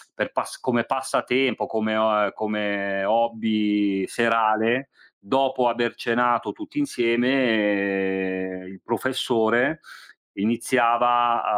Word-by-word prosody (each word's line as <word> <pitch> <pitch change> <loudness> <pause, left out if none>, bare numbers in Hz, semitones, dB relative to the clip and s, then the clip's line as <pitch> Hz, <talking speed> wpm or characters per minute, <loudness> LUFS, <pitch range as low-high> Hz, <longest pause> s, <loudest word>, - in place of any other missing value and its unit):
per - - -3
pass - - -4
come 120 -2 0
passatempo, 130 -1 0
come 110 0 -1
o 110 0 +3
a 105 -1 +3
uhm, 100 - -3
come 100 -2 -2
hobby, 105 -3 0
serale, 115 +3 +1 0.3
dopo 130 +3 +1
aver 120 0 -1
cenato 120 0 0
tutti 310 -2 -7
insieme, 100 - 0
il 95 0 -13
professore, 120 +3 0 0.6
iniziava 120 +2 +2
115 Hz, 100 wpm, -23 LUFS, 105-120 Hz, 0.6 s, o